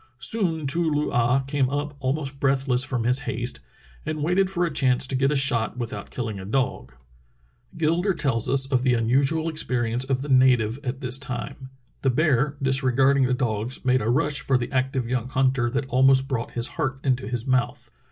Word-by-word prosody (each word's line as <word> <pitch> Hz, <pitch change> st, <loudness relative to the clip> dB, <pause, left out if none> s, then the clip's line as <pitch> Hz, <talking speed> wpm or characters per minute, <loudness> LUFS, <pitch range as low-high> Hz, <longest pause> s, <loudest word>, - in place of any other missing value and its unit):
Soon 165 Hz, -, +1 dB
Too 165 Hz, +4 st, +1 dB
loo 150 Hz, 0 st, -1 dB
ah 120 Hz, +3 st, +2 dB
came 135 Hz, -1 st, -1 dB
up 145 Hz, +1 st, -3 dB
almost 135 Hz, +1 st, -2 dB
breathless 135 Hz, -2 st, +1 dB
from 125 Hz, -3 st, -2 dB
his 125 Hz, +3 st, +2 dB
haste, 120 Hz, -, -3 dB, 0.4 s
and 155 Hz, -1 st, -4 dB
waited 185 Hz, +4 st, +2 dB
for 175 Hz, -2 st, 0 dB
a 165 Hz, -, -4 dB
chance 130 Hz, -2 st, +3 dB
to 130 Hz, -, -5 dB
get 135 Hz, +2 st, +2 dB
a -, -, 0 dB
shot 125 Hz, -5 st, +1 dB
without 110 Hz, -4 st, -6 dB
killing 110 Hz, -5 st, -5 dB
a -, -, -7 dB
dog. 105 Hz, -, -2 dB, 0.8 s
Gilder 170 Hz, +5 st, +1 dB
tells 135 Hz, -8 st, 0 dB
us 135 Hz, 0 st, +4 dB
of 130 Hz, -2 st, +2 dB
the 125 Hz, -1 st, +2 dB
unusual 135 Hz, +7 st, +1 dB
experi 125 Hz, -8 st, -1 dB
ence 125 Hz, +2 st, +1 dB
of 135 Hz, 0 st, -2 dB
the 145 Hz, -, -7 dB
native 130 Hz, -3 st, +3 dB
at 130 Hz, 0 st, -4 dB
this 130 Hz, 0 st, +1 dB
time: 135 Hz, 0 st, -6 dB, 0.3 s
"The 135 Hz, -, +2 dB
bear 140 Hz, +1 st, +1 dB
disregarding 135 Hz, 0 st, +3 dB
the 130 Hz, -, +1 dB
dogs 120 Hz, 0 st, -3 dB
made 130 Hz, 0 st, +3 dB
a 110 Hz, -, -1 dB
rush 145 Hz, +3 st, 0 dB
for 135 Hz, -, +1 dB
the 120 Hz, -, -4 dB
active 130 Hz, -2 st, -1 dB
young 125 Hz, 0 st, -2 dB
hunter 130 Hz, -2 st, +1 dB
that 135 Hz, +3 st, -2 dB
almost 135 Hz, +1 st, +4 dB
brought 125 Hz, -4 st, -3 dB
his 120 Hz, 0 st, -1 dB
heart 135 Hz, -1 st, -3 dB
into 130 Hz, -4 st, 0 dB
his 120 Hz, 0 st, -3 dB
mouth. 130 Hz, -2 st, -1 dB
130 Hz, 195 wpm, -24 LUFS, 125-140 Hz, 0.8 s, us